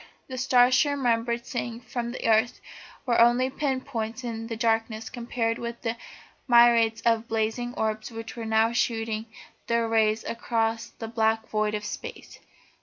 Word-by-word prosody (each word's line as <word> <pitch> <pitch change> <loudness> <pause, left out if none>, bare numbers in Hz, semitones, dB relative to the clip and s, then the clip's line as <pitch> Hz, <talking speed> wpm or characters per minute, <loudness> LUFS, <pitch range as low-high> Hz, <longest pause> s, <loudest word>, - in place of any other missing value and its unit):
The 255 -1 -5
stars 250 -1 +4
she 290 +3 +4
remembered 235 -3 0
seeing 240 -2 -4
from 240 0 -4
the 245 - -4
earth 225 +2 +3 0.5
were 235 -3 +3
only 245 +2 +4
pin 270 -2 -1
points 230 -2 -4
in 225 -1 -4
the 230 - -4
darkness 225 -1 0
compared 235 -1 -2
with 235 0 -6
the 225 -1 -1 0.5
myriads 235 -2 +5
of 230 -1 +1
blazing 225 +2 -1
orbs 215 0 -1
which 225 -1 -8
were 230 -2 -5
now 220 +1 +3
shooting 225 -2 -1 0.4
their 235 0 +1
rays 220 -1 +2
across 230 -1 -1
the 225 - -8
black 220 -1 0
void 215 0 0
of 210 0 -4
Space. - - -8
230 Hz, 160 wpm, -26 LUFS, 225-240 Hz, 0.5 s, myriads